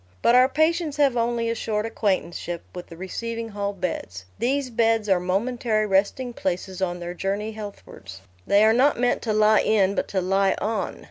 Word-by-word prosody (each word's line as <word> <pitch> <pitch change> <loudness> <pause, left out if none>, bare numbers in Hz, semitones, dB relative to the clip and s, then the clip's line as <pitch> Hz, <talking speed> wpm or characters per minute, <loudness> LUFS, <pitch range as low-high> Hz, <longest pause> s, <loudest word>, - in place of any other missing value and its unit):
But - - +5
our 255 +1 +6
patients 315 +1 +1
have 280 -4 +3
only 235 0 0
a 230 - 0
short 215 -2 -2
acquaintanceship 185 -6 -2
with 180 -1 -8
the 165 - -12
receiving 230 +5 -5
hall 200 -1 -3
beds: 130 - -5
these 260 +3 0
beds 225 -1 +2
are 190 -3 +3
momentary 215 +4 0
resting 210 +5 0
places 185 -1 -3
on 175 -1 -1
their 175 0 -5
journey 200 +4 -3
healthwards: 200 - -10 0.3
they 200 +1 +5
are 220 0 +5
not 260 +2 +3
meant 245 0 +1
to 225 - -2
lie 215 0 +4
in 200 -3 +2
but - - -2
to 195 - -1
lie 195 +1 +2
on. 220 +1 -2
215 Hz, 185 wpm, -24 LUFS, 190-235 Hz, 0.3 s, our